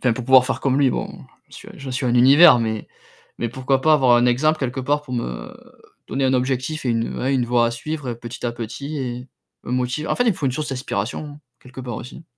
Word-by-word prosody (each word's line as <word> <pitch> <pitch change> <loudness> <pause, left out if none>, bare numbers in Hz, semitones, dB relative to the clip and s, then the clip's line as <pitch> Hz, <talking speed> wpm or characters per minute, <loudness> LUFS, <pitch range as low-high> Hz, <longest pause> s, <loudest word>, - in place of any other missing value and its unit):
enfin 125 - +2
pour 120 +1 -5
pouvoir 130 0 +6
faire 130 - -2
comme 135 0 +1
lui, 135 -2 +4
bon, - - -3 0.4
j'en - - -13
suis - - -11
à - - -13
j'en 135 -1 -7
suis 125 0 -2
à - - +1
un 120 - +1
univers 135 +4 +7
mais 110 -2 -3 0.5
mais 120 - -1
pourquoi 130 +2 0
pas 155 +3 +3
avoir 130 -5 +4
un 120 +1 +3
exemple 155 +6 +2
quelque 130 -1 -3
part 145 +3 0
pour 130 -4 -7
me 60 - -5 0.5
donner 135 0 -2
un 130 0 +2
objectif 130 +4 -1
et 125 - +1
une, 115 0 -1
ouais, 135 +2 0
une 125 -2 +1
voie 120 -1 +3
à - - 0
suivre 150 +3 -5
et 120 - -2
petit 120 +1 -6
à 120 - -2
petit 120 +6 -6
et 125 -1 -5 0.4
me - - -5
motiver. 125 +4 -1
En - - 0
fait, - - +1
il 235 - +4
me 190 - -3
faut 140 - -2
une 130 - 0
source 150 +3 -3
d'inspiration 135 +3 -4 0.2
quelque 125 +1 -11
part 120 -3 -5
aussi. 140 +6 -10
130 Hz, 260 wpm, -21 LUFS, 120-140 Hz, 0.5 s, univers